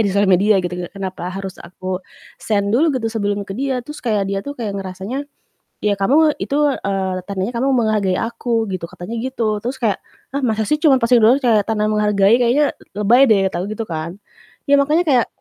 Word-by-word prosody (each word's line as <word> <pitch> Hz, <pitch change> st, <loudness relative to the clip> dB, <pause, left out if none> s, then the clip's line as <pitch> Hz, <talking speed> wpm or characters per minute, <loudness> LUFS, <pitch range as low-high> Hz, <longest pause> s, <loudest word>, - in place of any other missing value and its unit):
di 215 Hz, -, +2 dB
sosial 200 Hz, +1 st, +2 dB
media 195 Hz, +2 st, +4 dB
gitu 175 Hz, 0 st, -4 dB
kan, -, -, -32 dB
kenapa 185 Hz, -2 st, -5 dB
harus 195 Hz, 0 st, -7 dB
aku 185 Hz, +1 st, -5 dB, 0.4 s
send 200 Hz, -2 st, 0 dB
dulu 300 Hz, +8 st, +3 dB
gitu 225 Hz, -2 st, -2 dB
sebelum 205 Hz, -2 st, -1 dB
ke 195 Hz, -, -7 dB
dia. 255 Hz, +1 st, -2 dB
Terus 300 Hz, +2 st, -9 dB
kayak 210 Hz, -5 st, 0 dB
dia 195 Hz, 0 st, -2 dB
tuh 285 Hz, +7 st, -7 dB
kayak 220 Hz, -4 st, -3 dB
ngerasanya, 195 Hz, +9 st, -5 dB, 0.6 s
"Ya 205 Hz, -1 st, +1 dB
kamu 300 Hz, +9 st, +3 dB
itu, 280 Hz, -, -2 dB, 0.2 s
eee, 190 Hz, -2 st, -2 dB
tandanya 195 Hz, +4 st, -2 dB
kamu 270 Hz, -, +1 dB
menghargai 215 Hz, -5 st, +1 dB
aku 230 Hz, 0 st, -1 dB
gitu," 170 Hz, -2 st, -4 dB
katanya 225 Hz, +7 st, -6 dB
gitu. 230 Hz, -5 st, -2 dB
Terus 250 Hz, +4 st, -4 dB
kayak, 225 Hz, -6 st, -1 dB, 0.3 s
"Hah, 280 Hz, -, -1 dB
masa 220 Hz, -4 st, 0 dB
sih 300 Hz, +7 st, 0 dB
cuman 290 Hz, -4 st, +5 dB
posting 240 Hz, -1 st, +3 dB
doang 230 Hz, +4 st, +6 dB
kayak 220 Hz, -4 st, +3 dB
tanda 210 Hz, -1 st, 0 dB
menghargai 210 Hz, +2 st, +3 dB
kayaknya 265 Hz, +5 st, +3 dB
l 210 Hz, +1 st, -8 dB
lebay 250 Hz, +6 st, +6 dB
deh," 195 Hz, -3 st, +3 dB
kata 175 Hz, -, -2 dB
aku 190 Hz, -, -4 dB
gitu 225 Hz, -, -3 dB
kan. 165 Hz, 0 st, -5 dB, 0.5 s
Ya 285 Hz, -, +6 dB
makanya 305 Hz, +5 st, +2 dB
kayak, 250 Hz, -5 st, +4 dB
215 Hz, 205 wpm, -19 LUFS, 195-245 Hz, 0.6 s, doang